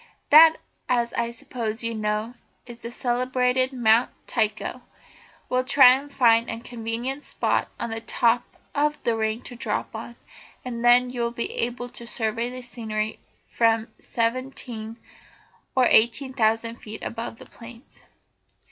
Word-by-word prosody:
that, 320 +2 +9 0.3
as 240 -2 +1
I 235 0 -1
suppose 230 -1 -5
you 230 0 0
know, 215 +1 -2 0.3
is 240 -1 -11
the 235 - -7
celebrated 255 +1 0
Mount 235 -1 +3 0.2
Tycho. 215 0 -1 0.7
I'll 255 0 +2
try 255 -1 +7
and 275 +3 -1
find 230 -3 +4
a 225 - -4
convenient 240 +4 -4
spot - - 0
on 235 - -3
the 225 0 -4
top 230 +1 +2 0.3
of 295 +1 +1
the 235 - +1
ring 220 +1 -2
to 245 - -9
drop 230 - -3
on, 230 +2 -7 0.5
and 235 -2 -5
then 245 +1 +5
you 245 -1 -4
will 235 - +1
be 235 0 -4
able 245 +1 -2
to 235 -1 -9
survey 230 +1 -1
the 255 0 -8
scenery 220 -3 -4 0.4
from 225 -1 +2
seventeen 230 -2 -3 0.8
or 255 -1 +5
eighteen 245 +4 +3
thousand 230 -1 +1
feet 215 0 -9
above 230 -1 -5
the - - -12
plains." 235 +1 -14
235 Hz, 150 wpm, -24 LUFS, 225-250 Hz, 0.8 s, that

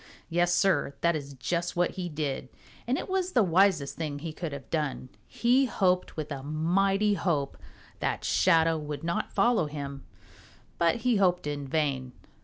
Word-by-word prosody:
Yes, 175 +1 +2
Sir, 175 -7 +2
that 170 -1 +3
is 140 -2 -6
just 170 +7 -2
what 175 0 +2
he 180 -2 -5
did, 145 -4 -3 0.4
and 255 +3 +1
it - - -4
was 375 -1 -1
the 240 - +5
wisest 180 -5 +2
thing 150 -3 -3
he 155 +2 -6
could 165 -1 -5
have 140 -4 -8
done. 150 -5 -2 0.2
He 250 +3 +3
hoped 185 -8 0
with 155 -1 -4
a 140 -2 -4
mighty 195 +8 +1
hope 160 -8 -1 0.4
that - - -2
Shadow 165 -3 +3
would 150 0 -6
not 170 +1 -2
follow 235 -9 +2
him, 140 -2 -6 0.8
but 170 -1 +3
he 245 -3 +4
hoped 180 -4 +2
in 145 -1 -3
vain. 135 -4 -1
165 Hz, 170 wpm, -28 LUFS, 145-185 Hz, 0.8 s, the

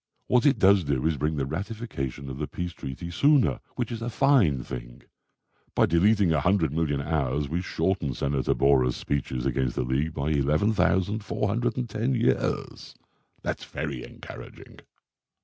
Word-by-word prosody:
What 125 +2 +3
it 135 -3 +4
does 100 -2 +5
do 70 -3 -1
is 80 -1 +2
bring 75 +3 -1
the 70 -2 -1
ratification 80 - -5
of 65 0 -6
the 75 - -2
Peace 90 -1 -5
Treaty 80 +6 -7
sooner, 140 - +3 0.2
which 120 -2 -2
is 115 -1 -5
a 120 - -2
fine 110 - +3
thing. - - -8 0.7
By - - +5
deleting 95 +1 +3
a 75 - +2
hundred 90 -3 +2
million 75 -3 0
hours 70 -2 -1
we 85 +5 -2
shorten 90 -7 -1
Senator 70 -1 0
Borah's 65 -3 +3
speeches 65 -3 -2
against 65 -2 0
the - - 0
League 70 +6 -1
by 75 +2 -1
11,410 105 - 0
years. 120 0 -1 0.5
That's - - -3
very 70 -5 -5
encouraging." - - -11
80 Hz, 150 wpm, -26 LUFS, 70-105 Hz, 0.7 s, does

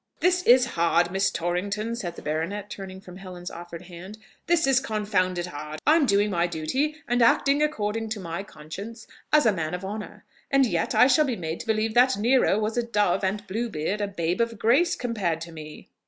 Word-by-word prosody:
"This 360 0 +3
is 245 +1 +7
hard, 170 +1 +2
Miss 195 +1 +2
Torrington!" 200 +6 -2
said 175 -7 -5
the - - -11
baronet, 175 +7 -3
turning 190 -1 -8
from 180 -1 -12
Helen's 180 -2 -8
offered 170 0 -9
hand; 180 +4 -10 0.3
"this 340 -1 +3
is 270 -1 +4
confounded 205 -7 -1
hard! 150 -2 -7
I'm 310 -2 +4
doing 205 0 +2
my 175 -1 +1
duty, 255 - -1
and 245 0 +1
acting 275 +5 +4
according 225 -7 -1
to 215 -1 -4
my 170 -1 -5
conscience 200 +6 -9 0.3
as 300 -3 +5
a 220 - +5
man 165 -1 -3
of 180 +1 -7
honour, 210 +2 -7 0.2
and 275 -1 +4
yet 235 - -1
I - - +7
shall 275 +4 +4
be 255 -4 -1
made 165 -4 -5
to - - -8
believe 220 0 0
that 250 -1 +4
Nero 235 -1 +3
was 215 +2 -2
a 240 - +2
dove, 210 -5 +1
and 205 +2 -1
Bluebeard 205 -2 -3
a 205 - 0
babe 175 0 -1
of 230 -1 -1
grace, 285 - +3
compared 210 - -2
to 170 0 -7
me!" 155 -1 -10
205 Hz, 200 wpm, -25 LUFS, 175-235 Hz, 0.3 s, is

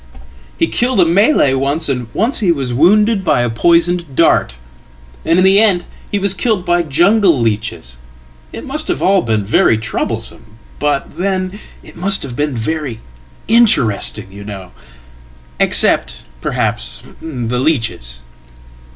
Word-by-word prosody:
He - - +1
killeda 240 -7 +1
Malay 190 - +3
once, 140 +4 -1
and 125 -4 -3
once 225 - -1
he 195 -6 +2
was 135 -6 -2
wounded 205 - +3
by 145 -8 +1
a 120 - -1
poisoned 170 +3 +1
dart. 60 - +2 0.7
And 165 - +1
in 185 - +4
the 195 +1 +5
endhe 195 -5 +2 0.3
was 200 -1 +1
killed 195 -1 -1
by 175 0 +2
jungle 175 - +2
leeches. 105 - -3 0.5
It - - -8
must 300 +3 -2
have - - -2
all 195 0 +3
been 110 -6 -1
very 110 +1 +3
troublesome, 110 -1 -4 0.2
but 145 +1 -2
then 185 +1 -2 0.2
it - - -15
must 195 +3 0
have 125 -3 -7
been 145 -1 -2
very 135 -1 -3 0.5
interesting, 120 - +2
you 100 +1 -10
know 100 -3 -9 0.9
except, - - +2 0.2
perhaps, - - -3 0.2
the 125 -6 -4
leeches."" 90 - -2
150 Hz, 135 wpm, -15 LUFS, 115-190 Hz, 0.9 s, the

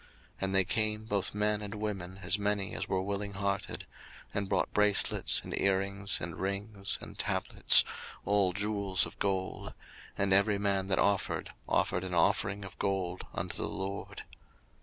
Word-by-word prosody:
02:035:022 - - -24 0.3
And 95 0 0
they 95 -1 +5
came, 110 +1 0
both 100 -2 0
men 105 0 +1
and 105 +1 -5
women, 95 -4 -4
as 105 - +5
many 100 -1 -1
as - - -3
were 95 0 0
willing 100 +1 -3
hearted, 100 0 -2 0.5
and 100 -1 -2
brought 95 -3 0
bracelets, 105 -1 +3
and - - -3
earrings, 100 +1 +1
and 80 -1 -5
rings, 100 +1 -1
and - - -10
tablets, - - +4 0.4
all 100 -2 +3
jewels 100 -1 +1
of - - -11
gold: 95 -1 -2 0.4
and 100 -1 +2
every 100 +1 +4
man 100 -1 0
that 95 - +1
offered 100 -1 +1 0.2
offered 90 - +1
an 90 -1 -3
offering 95 +4 +1
of 95 - -11
gold 95 -2 -2
unto - - -3
the - - -1
LORD. 95 +1 -5
100 Hz, 160 wpm, -31 LUFS, 95-105 Hz, 0.5 s, they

